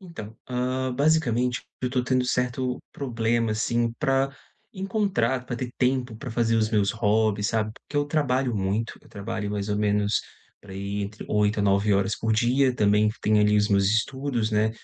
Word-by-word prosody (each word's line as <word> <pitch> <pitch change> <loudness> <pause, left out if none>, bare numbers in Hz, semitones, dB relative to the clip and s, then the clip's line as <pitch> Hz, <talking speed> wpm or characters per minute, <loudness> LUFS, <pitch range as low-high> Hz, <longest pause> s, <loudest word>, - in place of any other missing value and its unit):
Então, 140 - -9
hã, 130 +1 -1
basicamente, 125 -5 +1 0.2
eu 125 -1 -1
tô 125 -2 0
tendo 130 0 +1
certo 125 0 -1
problema, 115 -3 0
assim, 115 +2 0
pra 135 0 +1 0.4
encontrar, 195 - 0
pra 125 -1 -4
ter 125 0 -4
tempo 125 -2 0
pra 125 +2 -7
fazer 115 0 +1
os 110 -1 +2
meus 105 -2 +2
hobbies, 105 -2 +1
sabe, 110 -1 -1
porque 145 - -9
eu 145 - +3
trabalho 135 -5 0
muito, 100 +4 -1
eu - - -19
trabalho 105 0 -4
mais 105 0 -3
ou 105 - 0
menos 105 0 +1 0.4
para 100 -1 -12
aí 100 +1 -3
entre 105 +1 -7
8 105 0 +1
a - - +1
9 100 +1 +3
horas 100 +1 +1
por 110 0 0
dia. 125 +4 +2
Também 105 -1 +3
tenho 105 0 +3
ali 105 0 +4
os 105 +1 +3
meus 100 -1 +3
estudos, 120 +2 0
né, 110 +1 +2
115 Hz, 180 wpm, -25 LUFS, 105-130 Hz, 0.4 s, ali